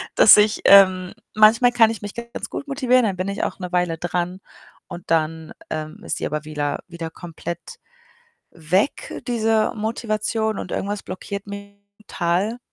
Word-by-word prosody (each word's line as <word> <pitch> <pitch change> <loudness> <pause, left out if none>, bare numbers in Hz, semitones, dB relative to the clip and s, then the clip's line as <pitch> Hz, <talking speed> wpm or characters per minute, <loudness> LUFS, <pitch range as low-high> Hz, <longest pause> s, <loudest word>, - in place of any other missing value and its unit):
dass 210 - +8
ich 210 0 +3
ähm, 185 -2 +6 0.2
manchmal 230 +3 +5
kann 225 -2 +5
ich 225 - -7
mich 205 -1 -7
ganz 235 0 -7
gut 285 - -6
motivieren, 255 -3 +2
dann 195 -4 -2
bin 185 - -3
ich 200 - -3
auch - - -3
'ne 180 -1 -6
Weile 175 -2 0
dran 175 +2 -3 0.5
und 175 0 -9
dann, 160 0 -1 0.2
ähm, 155 0 -5
ist - - -2
sie - - -3
aber 150 0 -4
wieder 150 -1 -3
wieder 170 -2 -6
komplett 170 0 -7 0.9
weg, 185 - -1
diese 225 -2 +1
Motivation 220 0 -2
und - - -7
irgendwas 205 0 -3
blockiert 200 +2 -7
mich 200 0 -9 0.3
total, 190 +7 -1
195 Hz, 160 wpm, -22 LUFS, 175-220 Hz, 0.9 s, dass